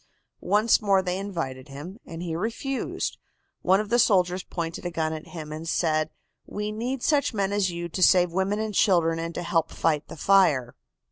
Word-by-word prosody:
"Once 210 +3 +4
more 195 -2 +3
they 180 0 -2
invited 165 -10 -4
him, 150 - -9
and 165 +1 -7
he 165 -2 -3
refused. 235 - -3 0.4
One 190 +2 +4
of 210 -1 -3
the 240 +2 +3
soldiers 185 -4 +3
pointed 170 -2 -5
a 175 - -2
gun 160 -2 -1
at 155 -1 -7
him 155 -3 -8
and 160 +2 -5
said: 155 -2 +1 0.4
"'We 210 +1 -4
need 240 +4 -3
such 285 -6 +2
men 200 -1 0
as 200 -2 +2
you 170 0 -4
to 185 - -4
save 180 -1 +5
women 190 +3 0
and 215 -1 -3
children 170 -5 +3
and 165 0 -4
to 175 - -3
help 165 -1 +1
fight 155 -2 0
the - - -10
fire. 150 -9 +3
180 Hz, 195 wpm, -26 LUFS, 165-205 Hz, 0.4 s, save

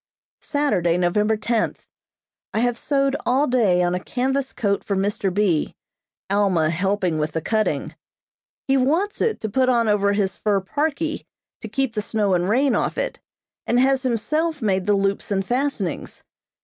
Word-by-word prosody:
Saturday, 185 - +1
November 210 +5 +1
tenth: 225 +1 -1 0.7
I 220 - +2
have 245 0 +1
sewed 275 +2 0
all 265 +4 +2
day 215 -9 +2
on 175 0 +1
a 180 - -1
canvas 265 +6 -1
coat 200 -3 -1
for 200 - -2
Mr. 195 0 0
B., 185 -5 +1 0.5
Alma 190 -6 +2
helping 185 -2 0
with 150 0 -2
the 160 - 0
cutting. 215 +5 -1 0.7
He 270 0 +3
wants 325 +11 +1
it 450 -1 +1
to 220 - -2
put 255 +5 +1
on 235 -2 +2
over 200 -1 +2
his 200 -2 -1
fur 205 -2 +1
parkie 305 - -2 0.3
to - - -6
keep 270 -4 -1
the 210 - -1
snow 210 -2 0
and 180 +1 +1
rain 265 +5 +3
off - - -1
it, - - -2 0.5
and 240 - +3
has 265 +1 +3
himself 305 +6 -1
made 190 -4 0
the 205 - +4
loops 195 0 -1
and 195 -2 0
fastenings. 245 - -2
215 Hz, 165 wpm, -22 LUFS, 195-265 Hz, 0.7 s, the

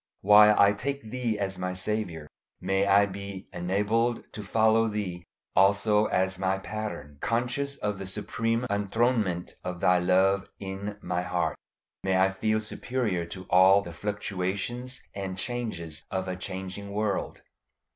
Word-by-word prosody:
While 105 +1 +7
I 100 0 +7
take 140 +2 -4
Thee 120 -4 -1
as 95 -2 -3
my 90 0 -2
Saviour, 90 -5 -3 0.3
may 95 +2 +1
I 100 +1 +6
be 100 -1 -7
enabled 105 +6 0
to 105 - -6
follow 110 +2 +3
Thee 100 -5 -3 0.3
also 105 +2 +4
as 95 0 0
my 95 0 +1
pattern; 105 -8 -6
conscious 125 +5 -1
of 105 -2 -2
the 95 - -5
supreme 115 +4 -1
enthronement 105 -3 0
of 90 -1 -4
Thy 90 +1 +4
love 95 +2 +3
in 100 +1 -5
my 90 - -1
heart, 90 0 -1 0.5
may 95 -1 +2
I 95 +1 +4
feel 110 +3 0
superior 110 -5 -2
to 95 +2 -7
all 95 +2 +6
the 85 - -8
fluctuations 105 +6 -3
and 95 -2 -4
changes 105 -9 -4
of 95 0 -2
a 90 - -2
changing 95 +2 -6
world. 105 -1 -2
100 Hz, 145 wpm, -28 LUFS, 95-110 Hz, 0.5 s, While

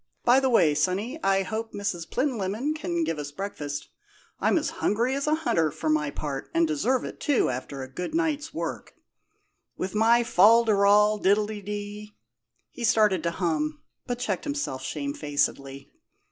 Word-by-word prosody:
By 245 +2 +5
the 265 -1 +1
way, 170 -11 +4
sonny, 190 - -1
I 195 0 +3
hope 220 +3 -5
Miss 180 -5 -3
Plinlimmon 250 +1 -1
can 175 - -2
give 160 -1 -2
us 145 0 -5
breakfast. 145 -5 -5 0.5
I'm - - +2
as - - -1
hungry 235 +5 +1
as 280 +2 -2
a 305 - +3
hunter, 165 - +1
for 155 +2 -4
my 150 -1 +1
part, 140 -1 -5
and 335 0 +4
deserve 265 -5 0
it, - - -8
too, 285 - +2
after 130 +2 -5
a - - -7
good 180 - -5
night's 320 -2 -1
work. - - -5 0.8
With 185 - -3
my 230 +3 +4
fol 230 +2 +5
de 220 - +3
rol, 205 +1 +4
diddledy 205 +1 -2 0.3
" 115 +1 -49
He 240 - -8
started 210 -5 +3
to 170 - 0
hum, 155 -3 -2 0.2
but 245 -1 -2
checked 210 -6 -2
himself 285 - -3
shamefacedly. 140 -2 -3
205 Hz, 165 wpm, -26 LUFS, 155-240 Hz, 0.8 s, By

